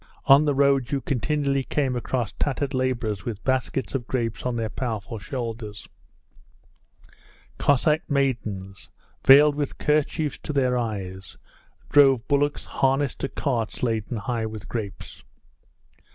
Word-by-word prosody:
On 140 Hz, +3 st, +7 dB
the 145 Hz, -2 st, +1 dB
road 140 Hz, -1 st, +3 dB
you 140 Hz, -, +1 dB
continually 140 Hz, +1 st, 0 dB
came 135 Hz, -2 st, -1 dB
across 120 Hz, -2 st, -2 dB
tattered 140 Hz, 0 st, -2 dB
labourers 120 Hz, -6 st, -1 dB
with 110 Hz, -3 st, -5 dB
baskets 130 Hz, 0 st, -1 dB
of 125 Hz, -4 st, -3 dB
grapes 115 Hz, -1 st, -2 dB
on 125 Hz, -, -1 dB
their 115 Hz, -1 st, -1 dB
powerful 110 Hz, -2 st, -4 dB
shoulders; 115 Hz, -2 st, -6 dB, 1.7 s
Cossack 150 Hz, +3 st, +2 dB
maidens, 110 Hz, -9 st, -2 dB, 0.3 s
veiled 145 Hz, +2 st, +8 dB
with 145 Hz, -1 st, -3 dB
kerchiefs 150 Hz, 0 st, 0 dB
to 150 Hz, -, -5 dB
their 130 Hz, -3 st, +2 dB
eyes, 95 Hz, -6 st, -4 dB, 0.5 s
drove 135 Hz, -4 st, +5 dB
bullocks 145 Hz, 0 st, +1 dB
harnessed 135 Hz, 0 st, 0 dB
to 135 Hz, -, -2 dB
carts 120 Hz, -7 st, -2 dB
laden 115 Hz, 0 st, -1 dB
high 110 Hz, +1 st, -2 dB
with 110 Hz, -2 st, -8 dB
grapes. 105 Hz, -5 st, -6 dB
130 Hz, 125 wpm, -25 LUFS, 115-140 Hz, 1.7 s, veiled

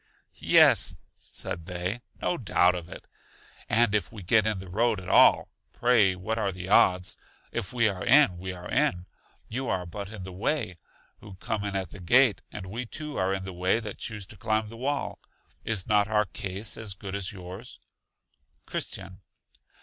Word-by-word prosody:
Yes, -, -, +6 dB, 0.2 s
said 80 Hz, -, -5 dB
they, 90 Hz, +6 st, -3 dB, 0.2 s
no -, -, 0 dB
doubt 90 Hz, -, +3 dB
of 90 Hz, -1 st, -6 dB
it. -, -, -10 dB, 0.6 s
And 115 Hz, -2 st, +4 dB
if 105 Hz, -4 st, 0 dB
we 105 Hz, -4 st, -9 dB
get 110 Hz, +4 st, +3 dB
in 110 Hz, -2 st, 0 dB
the 95 Hz, 0 st, -8 dB
road 110 Hz, +3 st, +1 dB
at 90 Hz, -, -10 dB
all, -, -, +5 dB, 0.2 s
pray 115 Hz, -6 st, +3 dB
what 110 Hz, +5 st, -3 dB
are 100 Hz, -2 st, 0 dB
the 90 Hz, 0 st, -7 dB
odds? 90 Hz, -3 st, +3 dB, 0.3 s
If 115 Hz, -5 st, -4 dB
we 120 Hz, -3 st, +2 dB
are 95 Hz, -3 st, -3 dB
in, 120 Hz, -9 st, +5 dB
we 95 Hz, +1 st, -5 dB
are 90 Hz, -1 st, -8 dB
in; 90 Hz, 0 st, +1 dB, 0.4 s
you 130 Hz, +2 st, -3 dB
are 90 Hz, -1 st, -1 dB
but 100 Hz, +3 st, -7 dB
in 105 Hz, -4 st, -8 dB
the 95 Hz, 0 st, -8 dB
way, 105 Hz, -, -2 dB, 0.4 s
who 100 Hz, -2 st, -12 dB
come 110 Hz, +2 st, -3 dB
in 100 Hz, -1 st, -3 dB
at 95 Hz, -1 st, -3 dB
the -, -, -10 dB
gate, 120 Hz, +6 st, +4 dB
and 105 Hz, -3 st, -7 dB
we 115 Hz, +6 st, -5 dB
too 150 Hz, +4 st, -6 dB
are 95 Hz, 0 st, +1 dB
in 95 Hz, -1 st, -2 dB
the 95 Hz, -1 st, -7 dB
way 90 Hz, +5 st, +1 dB
that 105 Hz, -3 st, -7 dB
choose 105 Hz, -3 st, -4 dB
to -, -, -16 dB
climb 110 Hz, +1 st, -1 dB
the 115 Hz, -, -10 dB
wall. 140 Hz, +4 st, -2 dB, 0.4 s
Is 110 Hz, -5 st, 0 dB
not 105 Hz, -2 st, +3 dB
our 105 Hz, -1 st, +2 dB
case 95 Hz, +3 st, -4 dB
as 110 Hz, -4 st, -5 dB
good 95 Hz, 0 st, -8 dB
as 100 Hz, -2 st, -2 dB
yours? 95 Hz, +4 st, -10 dB, 0.9 s
Christian. -, -, -5 dB
100 Hz, 190 wpm, -27 LUFS, 95-115 Hz, 0.9 s, Yes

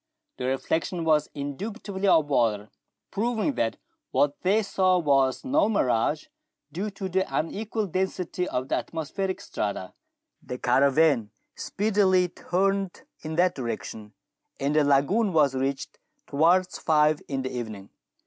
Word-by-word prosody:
The -, -, -4 dB
reflection 160 Hz, +6 st, -1 dB
was 155 Hz, -2 st, +3 dB
indubitably 195 Hz, -, -4 dB
of 160 Hz, -5 st, +5 dB
water, 110 Hz, -6 st, +1 dB, 0.4 s
proving 230 Hz, +5 st, 0 dB
that 115 Hz, -, -1 dB, 0.3 s
what 145 Hz, 0 st, +1 dB
they 205 Hz, +4 st, +2 dB
saw 185 Hz, -2 st, +2 dB
was 140 Hz, -, +2 dB
no 275 Hz, -2 st, +2 dB
mirage, 150 Hz, -, +1 dB, 0.5 s
due 190 Hz, +7 st, -3 dB
to 195 Hz, -1 st, -5 dB
the 190 Hz, +1 st, +1 dB
unequal 215 Hz, +6 st, -2 dB
density 185 Hz, -1 st, -2 dB
of 130 Hz, +1 st, -2 dB
the -, -, 0 dB
atmospheric 185 Hz, +4 st, -3 dB
strata. 100 Hz, -3 st, -4 dB, 0.5 s
The 125 Hz, -, -6 dB
caravan 135 Hz, -1 st, +3 dB, 0.3 s
speedily 195 Hz, -3 st, +2 dB
turned 195 Hz, +2 st, -1 dB, 0.2 s
in 155 Hz, 0 st, -5 dB
that 180 Hz, +1 st, +3 dB
direction, 110 Hz, -, -6 dB, 0.5 s
and 140 Hz, +2 st, 0 dB
the 155 Hz, -, +5 dB
lagoon 145 Hz, +10 st, +2 dB
was 145 Hz, -4 st, +4 dB
reached 135 Hz, +1 st, -3 dB, 0.3 s
towards 175 Hz, +5 st, +2 dB
five 150 Hz, -1 st, +3 dB
in 135 Hz, -2 st, -2 dB
the 130 Hz, -, -4 dB
evening. 110 Hz, -5 st, -6 dB
160 Hz, 130 wpm, -26 LUFS, 135-190 Hz, 0.5 s, of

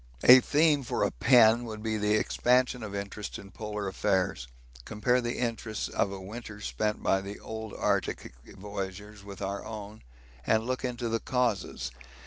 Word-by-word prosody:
A 125 Hz, +1 st, +10 dB
theme 150 Hz, +2 st, +3 dB
for 125 Hz, -, -1 dB
a -, -, +1 dB
pen 115 Hz, -, +5 dB
would 110 Hz, -2 st, -7 dB
be 110 Hz, -1 st, -1 dB
the 105 Hz, 0 st, +2 dB
expansion 125 Hz, +3 st, +2 dB
of 100 Hz, -2 st, -6 dB
interest 100 Hz, +1 st, -5 dB
in 100 Hz, -, -12 dB
polar 105 Hz, -1 st, -4 dB
affairs; 95 Hz, -7 st, 0 dB, 0.4 s
compare 125 Hz, -, +1 dB
the 120 Hz, 0 st, -3 dB
interests 115 Hz, -3 st, -2 dB
of 100 Hz, -, 0 dB
a 100 Hz, -, -6 dB
winter 105 Hz, +2 st, -8 dB
spent 105 Hz, +1 st, -2 dB
by 95 Hz, -, +2 dB
the 100 Hz, +1 st, -7 dB
old 110 Hz, -1 st, -7 dB
Arctic -, -, -1 dB
voyagers 100 Hz, +1 st, -7 dB
with 100 Hz, 0 st, -8 dB
our 100 Hz, +1 st, -3 dB
own, 105 Hz, -1 st, -8 dB, 0.4 s
and 110 Hz, -, +2 dB
look 130 Hz, +1 st, -2 dB
into 120 Hz, -1 st, -2 dB
the 115 Hz, 0 st, 0 dB
causes. 110 Hz, -, -1 dB
110 Hz, 165 wpm, -29 LUFS, 100-120 Hz, 0.4 s, A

